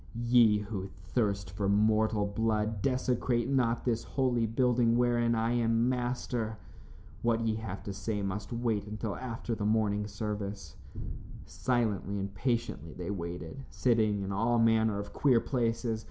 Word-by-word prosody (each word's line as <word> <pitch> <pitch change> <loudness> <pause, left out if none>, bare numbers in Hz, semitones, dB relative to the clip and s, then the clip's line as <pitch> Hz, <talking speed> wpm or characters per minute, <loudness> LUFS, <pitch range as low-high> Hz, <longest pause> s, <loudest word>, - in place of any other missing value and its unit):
"Ye 120 -2 +5
who 100 -2 -4
thirst 100 0 -2
for 100 +1 -1
mortal 110 +1 +3
blood, 110 0 0
desecrate 125 -1 +1
not 125 -3 +1
this 115 -2 0
holy 125 -4 +1
building 120 0 +2
wherein 120 -1 +2
I 115 +1 +1
am 115 0 +2
master. 120 -3 -2 0.6
What 115 -1 +2
ye 115 -1 +1
have 100 -3 -6
to 100 - -5
say 100 +1 -3
must 100 +3 -4
wait 115 -4 -1
until 105 0 -4
after 120 -2 -4
the 110 - -3
morning 105 -1 +1
service." 100 -5 -5 0.7
Silently 110 -5 -1
and 100 0 -4
patiently 100 - -2
they 90 +2 -5
waited, 85 - -5
sitting 110 -5 +2
in 95 - -4
all 115 +4 +2
manner 110 -2 +3
of 100 0 -6
queer 130 -5 +4
places. 115 -2 -1
110 Hz, 145 wpm, -31 LUFS, 100-120 Hz, 0.7 s, Ye